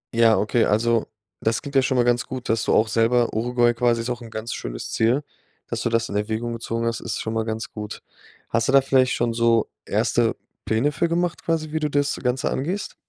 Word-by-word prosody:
Ja, 115 -1 +5
okay, 110 +2 +2
also, 115 +2 +2 0.3
das 110 +1 0
klingt 140 - -7
ja 135 - +6
schon 130 0 0
mal 120 - +4
ganz 120 0 +1
gut, 130 -2 -6
dass 115 0 +1
du - - +1
auch 110 - +4
selber 115 +2 +2
Uruguay 120 +1 +2
quasi 120 -1 +1
ist 120 +2 -3
auch 120 0 -4
'n 115 - -9
ganz 110 +1 -5
schönes - - -6
Ziel, 120 +6 +2 0.4
dass - - -4
du - - 0
das 115 0 +1
in - - -6
Erwägung 110 +3 -2
gezogen 115 0 -3
hast, 115 0 -1
ist - - -4
schon 110 - -3
mal 110 0 -1
ganz 110 0 -4
gut. 105 0 -7 0.5
Hast 115 0 +1
du - - +2
da 135 0 +7
vielleicht 130 -1 +3
schon 120 -1 0
so 115 -1 +2
1. - - +1 0.3
Pläne 115 +7 +1
für 170 +4 0
gemacht 175 0 -1
quasi, 160 -2 -1
wie 160 - -1
du 150 -1 -1
das 145 -1 0
Ganze 125 0 0
angehst? 180 +9 -3
120 Hz, 230 wpm, -23 LUFS, 115-130 Hz, 0.5 s, da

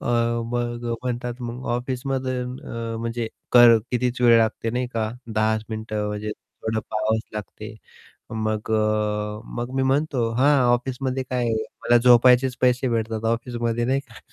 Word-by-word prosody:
अ, 115 -1 0
मग 120 0 -2 0.2
म्हणतात, 120 -1 -3
मग 120 +1 -6
ऑफिसमध्ये 130 +1 -2
अ, 115 -2 -5
म्हणजे 115 0 -3 0.2
कर 120 -2 +8
कितीच 125 0 -1
वेळ 120 -1 +6
लागते 115 0 0
नाही 125 +1 -1
का 110 -1 0 0.2
10 110 0 +1
चं 110 - -11
मिनिट 110 0 -6
म्हणजे 105 0 -2 0.3
थोडं 110 0 -1
पहावच 110 +1 0
लागते, 105 -1 -7 0.6
मग 110 0 -2
अ, 105 -1 0 0.2
मग 120 +2 -4
मी 135 - +2
म्हणतो 135 -3 +1
"हां, 140 +4 +4 0.2
ऑफिसमध्ये 130 +1 -2
काय 125 -2 0 0.3
मला 120 - +5
झोपायचेच 125 +1 +5
पैसे 125 +1 +3
भेटतात 115 -1 -2
ऑफिसमध्ये" 120 -1 -2
"नाही 135 +2 +1
का." 115 -4 -14
120 Hz, 145 wpm, -23 LUFS, 110-125 Hz, 0.6 s, कर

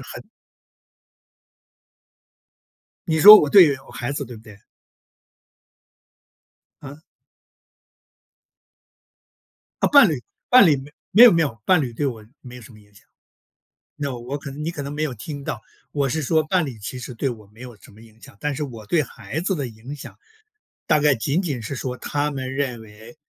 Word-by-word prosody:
很 - - -9 2.9
你 160 - +1
说 210 +1 +11
我 150 - 0
对 170 -7 +7
我 - - -15
孩 125 +3 -4
子， 140 0 -4
对 120 - -11
不 110 - -15
对？ 105 -3 -15 2.2
嗯？ 145 +1 -10 2.8
啊， - - +3
伴 280 -9 +7
侣 150 - -2 0.3
伴 250 -4 +7
侣 155 -4 +4
没 135 +2 -11 0.2
没 225 +6 +7
有 245 - +9
没 165 - +2
有， 115 -7 -5
伴 185 -2 +4
侣 125 -4 -5
对 145 - -3
我 115 -5 -7 0.2
没 125 -2 -12
有 125 - -11
什 120 - -15
么 105 - -17
影 105 0 -23
响。 - - -21 0.9
那 140 -3 -4
我 125 +4 -6
可 140 -1 -9
能 145 +2 -8
你 160 - -2
可 150 - -7
能 140 - -6
没 150 - -5
有 150 - -2
听 140 +6 -8
到， 110 - -5 0.3
我 140 -2 -1
是 155 +5 -2
说 155 +3 +1
伴 175 +4 0
侣 130 -5 -8
其 125 +5 -7
实 125 - -8
对 135 - -2
我 110 -4 -9
没 110 +4 -18
有 125 -2 -10
什 - - -18
么 105 - -19
影 115 -1 -20
响， 100 - -16
但 150 -1 -3
是 150 - -4
我 115 -6 -9
对 160 +8 +1
孩 150 +1 -7
子 190 +3 -1
的 140 -5 -4
影 120 +5 -10
响 - - -12 0.7
大 155 - +2
概 145 -2 +3
仅 140 +9 -1
仅 145 -10 -4
是 125 +6 -5
说， 125 -1 -5
他 145 +4 -2
们 130 -2 -5
认 135 -4 -3
为 110 +4 -15
140 Hz, 200 characters per minute, -21 LUFS, 120-150 Hz, 2.9 s, 说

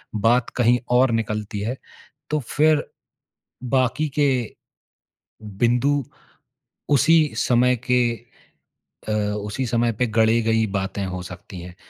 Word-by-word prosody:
बात 115 +3 +2
कहीं 120 0 +3 0.2
और 130 0 +4
निकलती 105 -2 -3
है, 120 +5 -3 0.5
तो 150 - +1
फिर 150 +3 +2 0.9
बाकी 135 +3 +1
के 130 -6 +1 1.1
बिंदु 130 +4 +2 0.9
उसी 155 +2 +4
समय 125 +1 +3 0.2
के 125 - +4 1.1
अ, - - 0
उसी 105 +3 -2
समय 120 0 +1
पे 125 - +3
गढ़े 110 +1 +2
गई 110 0 +2
बातें 100 0 -3
हो 90 -1 -5
सकतीं 90 +1 -10
हैं। 90 0 -11
120 Hz, 115 wpm, -22 LUFS, 105-130 Hz, 1.1 s, और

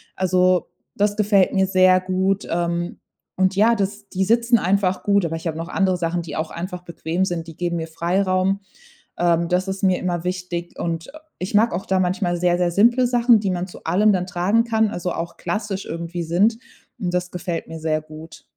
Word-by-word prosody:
Also, 185 -1 +2 0.3
das 205 0 +1
gefällt 200 -3 +3
mir 190 -1 +2
sehr 185 -1 +5
gut, 190 +1 0
ähm, 170 0 -2 0.4
und, 190 0 +2
ja, 220 +4 +4
das 205 0 -3
die 190 0 -1
sitzen 235 +3 +3
einfach 190 0 +1
gut, 200 -2 +2
aber 165 0 -2
ich 165 - -6
habe 160 - -3
noch 165 +1 -5
andere 190 -2 +1
Sachen, 175 0 -1
die 160 -3 -7
auch 155 - -3
einfach 180 +1 -5
bequem 170 +1 -2
sind. 170 -3 -4
Die 160 - -10
geben 175 -1 -1
mir 160 0 -4
Freiraum, 185 +3 0 0.6
ähm, 170 0 +2
das 180 +2 +1
ist 190 +1 -4
mir 185 -2 +3
immer 175 -2 -2
wichtig, 180 -1 -4
und 165 +8 -3 0.3
ich 185 +2 -3
mag 225 0 +4
auch 180 - -3
da 190 -1 +2
manchmal 180 -1 0
sehr, 175 0 +2
sehr 175 -1 +1
simple 240 +7 +4
Sachen, 240 -2 +4
die 200 - -1
man 180 0 -2
zu 180 - -13
allem 210 +3 +3
dann 180 -1 -1
tragen 185 +6 +2
kann, 220 -2 +1
also 180 -3 -3
auch 170 0 -5
klassisch 205 -2 -3
irgendwie 170 +1 -4
sind, 200 +8 +2 0.4
und 180 -2 -2
das 180 0 -1
gefällt 175 -2 -4
mir 160 0 -7
sehr 155 -1 0
gut. 155 +1 -12
185 Hz, 205 wpm, -22 LUFS, 170-200 Hz, 0.6 s, sehr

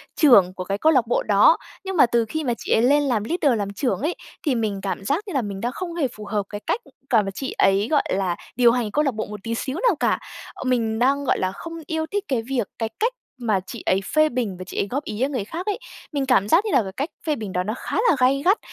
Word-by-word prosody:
trưởng 200 - +6
của 185 - -5
cái 195 +2 -2
câu 315 +9 +4
lạc 250 -6 +3
bộ - - +1
đó. 205 +10 +5 0.3
Nhưng 385 -1 -3
mà - - +8
từ 235 -1 +1
khi 315 +8 -3
mà 245 -4 0
chị - - -6
ấy 225 - +4
lên 285 +4 +4
làm 240 -7 0
leader, 285 -2 +1
làm 200 0 -3
trưởng 255 +3 -1
ấy, 315 +5 -1 0.3
thì 280 -5 +2
mình 215 -4 -1
cảm 195 -1 -3
giác 290 - 0
như 380 - -5
là 270 - +2
mình 200 -3 -5
đang 240 +2 -1
không 345 +5 -5
hề 310 -6 +1
phù 215 -3 -10
hợp 205 0 -1
cái 205 0 -6
cách 470 - 0 0.3
cả 230 -4 +5
và 195 -1 -4
chị 265 +7 -5
ấy, 195 +2 +3
gọi 295 - +4
là, 185 -2 0 0.2
điều 240 -1 +5
hành 235 -3 -1
câu 300 - +2
lạc 275 - +1
bộ 215 0 -3
một 210 0 -8
tí 230 0 -2
xíu 265 +5 -3
nào 435 - +4
cả. - - +2 0.3
Ờ, - - -8
mình 230 -4 0
đang, 275 +3 +2
gọi - - +1
là, 185 - 0
không 330 - -8
yêu 320 -1 -1
thích 405 0 -1
cái 255 -4 0
việc 240 -3 -2
cái 225 -1 -1
cách 465 +3 +1 0.2
mà 220 -6 +1
chị 235 - -8
ấy 190 +1 +2
phê 310 0 +5
bình 235 -8 -2
và 185 - -6
chị 185 - -9
ấy - - 0
góp 275 +7 -3
ý, 210 -2 -5
a, 265 - +3
người 255 -8 -3
khác 335 - -6
ấy. 415 +2 -1 0.3
Mình 285 -3 -1
cảm 245 -7 +3
giác 335 - +4
như 425 - -1
là - - +4
cái 190 - -6
cách 280 - -3 0.2
phê 305 -2 +1
bình 210 -6 -6
đó 180 - 0
nó 210 +3 -2
khá - - -4
là - - +5
gay 260 +2 +3
gắt. 390 +5 +5
245 Hz, 290 wpm, -23 LUFS, 205-290 Hz, 0.3 s, mà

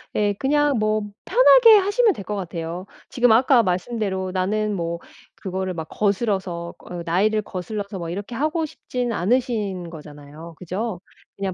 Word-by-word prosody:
예 205 -1 +2
그냥 285 +2 +1
뭐 215 0 +1 0.2
편하게 - - +7
하시면 410 +3 +3
될 200 - -8
것 210 - -4
같아요. 175 -1 -5 0.2
지금 245 -2 +3
아까 245 +1 +5
말씀대로 190 0 -2
나는 210 +3 0
뭐 170 -1 -3 0.4
그거를 190 -1 -4
막 160 -2 -5
거스러서 195 -5 -1
어 175 -1 -7
나이를 205 +6 +2
거슬러서 200 +1 -5
뭐 170 -1 -5
이렇게 200 +7 -5
하고 310 +6 0
싶지는 250 -5 -4
않으신 210 -4 -1
거잖아요. 150 +1 -11
그죠? 185 +2 -4 0.3
그냥 195 -1 -3
200 Hz, 325 characters per minute, -22 LUFS, 180-235 Hz, 0.4 s, 편하게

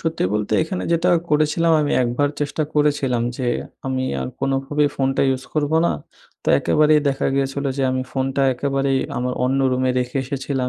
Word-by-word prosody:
সত্যি 165 - -1
বলতে 105 -1 -2
এখানে 180 +3 -4
যেটা 170 +2 +2 0.2
করেছিলাম 155 +2 +2
আমি 145 - 0
একবার 125 +4 +1
চেষ্টা 145 +2 -1
করেছিলাম, 140 -5 +1
যে 130 - -3 0.4
আমি 130 0 -1 0.2
আর 65 - -3
কোনোভাবেই 135 +2 +1
ফোনটা 135 0 +1
ইউজ 130 0 -1
করবো 155 0 +1
না। - - +1 0.5
তো - - -3
একেবারেই 150 0 +3
দেখা 135 -1 0
গিয়েছিল 135 +1 -1
যে 140 - -1
আমি 130 0 -1
ফোনটা 135 +1 -1
একেবারেই 135 +1 0 0.2
আমার 125 +1 -1
অন্য 130 +2 +1
রুমে 130 0 +1
রেখে 125 +1 -3
এসেছিলাম। 135 -1 -2
135 Hz, 170 wpm, -21 LUFS, 130-150 Hz, 0.5 s, একেবারেই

